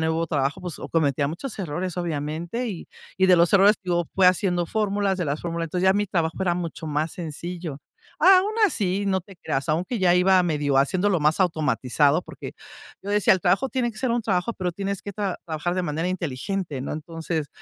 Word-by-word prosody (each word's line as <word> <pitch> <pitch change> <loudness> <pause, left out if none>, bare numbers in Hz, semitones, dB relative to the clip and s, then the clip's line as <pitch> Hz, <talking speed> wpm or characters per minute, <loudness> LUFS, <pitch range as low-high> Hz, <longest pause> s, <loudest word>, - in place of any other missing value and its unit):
nuevo 160 +1 0
trabajo, 145 +3 -1
pues 175 -5 -5
o - - -7
cometía 145 -3 +1
muchos 210 - -6
errores, 180 +1 -3
obviamente, 170 +8 -3
y 185 -5 -7 0.3
y 190 - +4
de 185 -1 +6
los 170 0 +3
errores 200 +2 +6
te - - -57
digo 175 -2 +1
fui 190 - +3
haciendo 180 -1 +2
fórmulas 200 -1 0
de 175 - -1
las 145 +2 -2
fórmulas, 170 -1 -3
entonces 180 +3 -2
ya 190 - +6
mi 205 0 +1
trabajo 170 -4 -1
era 180 -2 +1
mucho 170 -2 -5
más 155 +2 -1
sencillo. 170 -2 -6 0.4
A 370 +3 +8
aún 405 +4 -1
así, 200 - -1
no 190 -1 +1
te 190 0 -16
creas, 135 -2 -3
aunque 180 +9 -1
ya 180 -2 +4
iba 185 +1 +4
medio 145 -5 +1
haciéndolo 180 +5 +2
más 155 +5 +2
automatizado 150 -2 +2
porque - - -9 0.5
yo 200 - -5
decía: 205 -2 +4
"El 185 - -3
trabajo 195 +10 +2
tiene 245 -3 -1
que 215 - -12
ser 255 -1 -1
un 240 -1 0
trabajo, 200 +2 -1
pero 180 -2 -3
tienes 195 +1 -4
que 200 - -6
tra 200 -2 -3
trabajar 165 +2 -2
de 185 - -1
manera 160 +2 -2
inteligente". 170 -1 -3
No, - - -4
entonces, 160 -1 -4
175 Hz, 210 wpm, -24 LUFS, 160-195 Hz, 0.5 s, A